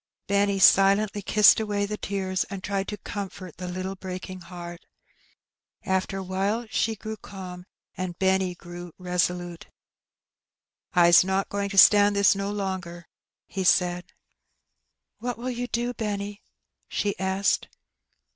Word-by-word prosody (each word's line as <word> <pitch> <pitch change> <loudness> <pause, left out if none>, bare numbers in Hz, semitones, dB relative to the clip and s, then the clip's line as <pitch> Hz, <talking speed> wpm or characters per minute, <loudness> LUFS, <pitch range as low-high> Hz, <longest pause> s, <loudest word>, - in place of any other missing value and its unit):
Benny 200 0 +1
silently 195 +2 +5
kissed 210 +2 +5
away 205 -2 -1
the 210 +1 -4
tears, 190 -2 -2
and 195 -1 -8
tried 195 -1 -2
to 210 - -4
comfort 190 -3 -7
the 180 0 -6
little 185 +2 -4
breaking 185 0 -7
heart. 175 0 -9 1.0
After 190 +1 -1
awhile 195 +5 -1
she 225 0 0
grew 220 +1 -7
calm, 180 -3 -9 0.3
and 185 -2 -4
Seniiy 190 -2 +1
grew 175 -1 -10
resolute. 180 -1 -2 1.3
"I's 175 -1 +7
not 190 +1 -1
going 200 0 -2
to 195 - -6
stand 205 +1 +7
this 200 -1 +5
no 195 0 -3
longer," 190 -4 -4 0.4
he 195 - -5
saicl. 180 -1 +2 0.6
" - - -54
What 245 -1 -3
will 250 +2 -4
you 245 0 -4
do, 240 +1 -2
Benny? 205 -2 -4 0.2
" - - -57
she 205 -1 -1
asked. 190 +1 0
195 Hz, 135 wpm, -26 LUFS, 180-205 Hz, 1.3 s, I's